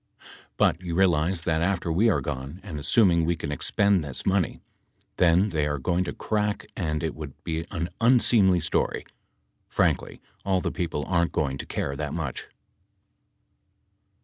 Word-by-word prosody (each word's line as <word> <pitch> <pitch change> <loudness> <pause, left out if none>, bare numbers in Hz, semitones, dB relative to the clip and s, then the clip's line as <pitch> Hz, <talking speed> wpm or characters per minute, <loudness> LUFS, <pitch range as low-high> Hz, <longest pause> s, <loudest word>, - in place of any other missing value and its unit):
But 85 - +2
you 85 -2 -4
realize 85 -2 +2
that 80 -1 0
after 90 -1 0
we 105 +8 +3
are 100 - +2
gone, 70 +2 -5
and 85 -7 -6
assuming 85 +1 +3
we 85 +2 +1
can 80 -3 -5
expend 100 +5 +2
this 70 -3 -5
money, 95 -2 +1 0.6
then 90 +3 +4
they 75 -3 0
are 75 0 -1
going 90 +6 0
to - - -3
crack 105 -1 -2
and 75 -4 -2
it 80 - -1
would 75 -3 -8
be 80 +1 -3
an 85 -2 -3
unseemly 115 -6 +4
story. - - -1 0.6
Frankly, - - 0 0.2
all 95 -1 +1
the - - -2
people 80 -5 -3
aren't 85 0 +1
going 70 -2 -1
to - - -6
care 70 - -3
that 75 +1 -4
much. 80 -6 -4
85 Hz, 160 wpm, -26 LUFS, 75-95 Hz, 0.6 s, then